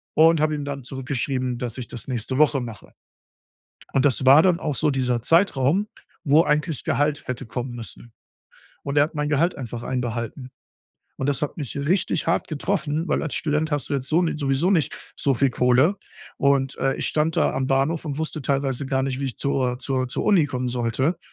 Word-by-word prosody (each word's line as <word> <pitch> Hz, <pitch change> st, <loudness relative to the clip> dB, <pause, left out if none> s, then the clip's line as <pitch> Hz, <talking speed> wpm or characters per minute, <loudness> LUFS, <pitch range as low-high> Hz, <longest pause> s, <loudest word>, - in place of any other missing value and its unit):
und 165 Hz, +1 st, +6 dB
habe 155 Hz, 0 st, +2 dB
ihm 145 Hz, -, -4 dB
dann 140 Hz, -1 st, -5 dB
zurückgeschrieben, 130 Hz, -1 st, -2 dB
dass 120 Hz, -2 st, -4 dB
ich 125 Hz, -3 st, -6 dB
das 115 Hz, -, -8 dB
nächste 130 Hz, 0 st, -3 dB
Woche 150 Hz, -3 st, +4 dB
mache. 115 Hz, -3 st, -9 dB, 1.0 s
Und 135 Hz, -, +3 dB
das 135 Hz, -1 st, +1 dB
war 135 Hz, +4 st, +8 dB
dann 180 Hz, -1 st, +3 dB
auch 150 Hz, -3 st, -2 dB
so 155 Hz, -, +2 dB
dieser 125 Hz, -4 st, 0 dB
Zeitraum, 165 Hz, -, +2 dB, 0.4 s
wo 155 Hz, +1 st, +5 dB
eigentlich 150 Hz, 0 st, 0 dB
Gehalt 145 Hz, +1 st, 0 dB
hätte 130 Hz, +1 st, -4 dB
kommen 125 Hz, +2 st, -4 dB
müssen. 120 Hz, 0 st, -10 dB, 0.7 s
Und 140 Hz, +1 st, -3 dB
er 145 Hz, -, +7 dB
hat 155 Hz, +1 st, -5 dB
mein 150 Hz, 0 st, -1 dB
Gehalt 160 Hz, +5 st, +2 dB
einfach 120 Hz, -2 st, -6 dB
einbehalten. 125 Hz, +1 st, -4 dB, 0.7 s
Und 135 Hz, -, -1 dB
das 140 Hz, +1 st, -1 dB
hat 150 Hz, -, -3 dB
mich 145 Hz, -5 st, -5 dB
richtig 155 Hz, +7 st, 0 dB
hart 165 Hz, -, 0 dB
getroffen, 155 Hz, 0 st, -2 dB
weil -, -, +1 dB
als 155 Hz, -, -3 dB
Student 155 Hz, 0 st, 0 dB
hast 145 Hz, -4 st, -2 dB
du -, -, -1 dB
jetzt 135 Hz, -1 st, -2 dB
so 165 Hz, +5 st, +3 dB
ni 165 Hz, -, -1 dB
sowieso 145 Hz, +5 st, +1 dB
nicht 165 Hz, -6 st, -1 dB
so 135 Hz, -2 st, +1 dB
viel 135 Hz, +2 st, +2 dB
Kohle. 125 Hz, +11 st, +3 dB, 0.4 s
Und, 140 Hz, -1 st, +2 dB
äh, 135 Hz, 0 st, 0 dB
ich -, -, -2 dB
stand 155 Hz, +1 st, 0 dB
da -, -, +2 dB
am 130 Hz, 0 st, -1 dB
Bahnhof 135 Hz, +5 st, +1 dB
und 145 Hz, -2 st, -4 dB
wusste 155 Hz, -1 st, -3 dB
teilweise 135 Hz, 0 st, -1 dB
gar 130 Hz, -1 st, 0 dB
nicht, 130 Hz, -1 st, -2 dB
wie 140 Hz, -, -2 dB
ich 130 Hz, -, -5 dB
zur 130 Hz, -3 st, 0 dB
zur 130 Hz, 0 st, -1 dB
zur 125 Hz, -, -3 dB
Uni 190 Hz, -8 st, +4 dB
kommen 125 Hz, -1 st, -3 dB
sollte, 125 Hz, +6 st, 0 dB
140 Hz, 205 wpm, -23 LUFS, 130-155 Hz, 1.0 s, war